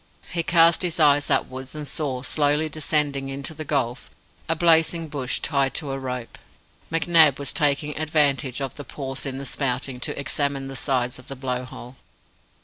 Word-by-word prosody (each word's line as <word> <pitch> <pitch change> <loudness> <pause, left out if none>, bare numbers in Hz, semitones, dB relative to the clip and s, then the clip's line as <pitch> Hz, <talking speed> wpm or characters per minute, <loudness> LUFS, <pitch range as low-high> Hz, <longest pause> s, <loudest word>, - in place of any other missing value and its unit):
He 170 - +1
cast 165 0 +4
his 175 -2 +1
eyes 145 -1 +4
upwards 130 +2 -1
and 150 -1 -5
saw, 135 -3 -2
slowly 150 +2 +1
descending 145 -3 0
into 140 +3 -3
the 155 0 -6
gulf, 135 -4 -2 0.4
a 165 - +2
blazing 165 0 +3
bush 135 -4 -2
tied 140 -2 0
to 145 -5 -1
a 135 - -3
rope. 125 -3 -6 0.5
McNab 165 -3 +5
was 140 - -4
taking 150 0 +1
advantage 145 -4 +1
of 135 -2 -3
the 145 - -8
pause 135 +1 -5
in 135 -1 -3
the 140 - -6
spouting 130 -1 -2
to - - -3
examine 140 -1 -2
the 135 - -7
sides 125 -2 -1
of 130 - -15
the 135 - -3
Blow 125 -1 -3
hole. 125 0 -11
140 Hz, 175 wpm, -24 LUFS, 130-155 Hz, 0.5 s, McNab